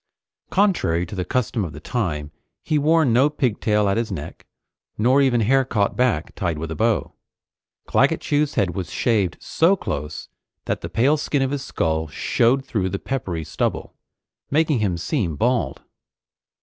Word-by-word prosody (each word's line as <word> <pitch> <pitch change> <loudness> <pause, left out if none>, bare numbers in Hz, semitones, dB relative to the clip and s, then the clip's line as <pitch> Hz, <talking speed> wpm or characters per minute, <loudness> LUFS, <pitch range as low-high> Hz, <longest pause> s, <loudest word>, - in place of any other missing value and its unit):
Contrary 180 - +2
to 85 - -10
the 95 -2 -2
custom 120 -1 -1
of 80 -5 -5
the 75 - -8
time, 75 -7 -3 0.3
he 150 - +1
wore 160 +2 +4
no 130 +3 +4
pigtail 105 -7 +1
at 100 - +1
his 115 -2 -1
neck, 80 -3 -7 0.5
nor 125 +6 +4
even 125 -4 +3
hair 135 +5 +3
caught 105 -6 0
back, 125 -11 0
tied 85 -4 -2
with 80 +1 -5
a - - -3
bow. 115 0 0 0.7
Claggett - - +2
Chew's 150 0 0
head 90 -3 +1
was 90 -3 -4
shaved 100 -6 0
so 170 +5 +2
close 75 - -5 0.4
that - - -2
the - - -5
pale 140 +7 +3
skin 145 -2 0
of 135 - -1
his 140 -2 -3
skull 80 -8 -1
showed 120 - +1
through 95 -6 -1
the 100 - -2
peppery 95 -10 -3
stubble, - - -2 0.6
making 150 -2 +2
him 95 -5 0
seem 90 - -1
bald. 115 - 0
115 Hz, 165 wpm, -22 LUFS, 85-135 Hz, 0.7 s, wore